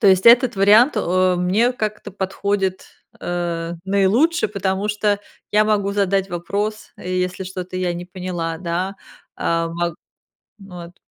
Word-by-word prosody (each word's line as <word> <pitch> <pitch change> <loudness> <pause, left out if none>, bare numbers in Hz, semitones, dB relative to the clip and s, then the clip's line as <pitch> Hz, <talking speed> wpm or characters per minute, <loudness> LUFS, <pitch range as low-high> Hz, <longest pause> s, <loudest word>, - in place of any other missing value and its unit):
То 210 - +3
есть 190 +1 +5
этот 240 -1 +7
вариант, 215 +8 +5
о, 185 +1 +2
мне 200 +8 +2
как-то 215 -3 -4
подходит, 190 0 -2 0.3
э, 170 -1 -3
наилучше, 210 - +2
потому 195 0 -2
что 210 -1 0 0.3
я 210 +1 +4
могу 200 -2 +1
задать 195 -1 +1
вопрос, 205 +5 -3
если 180 +1 -3
что-то 185 0 -6
я 180 -1 0
не 175 +1 -6
поняла. 180 -3 -4
Да, 185 +3 -3 0.4
а, 165 0 0
мог 170 0 -2 0.6
вот. 180 -3 -11
190 Hz, 135 wpm, -20 LUFS, 180-205 Hz, 0.6 s, этот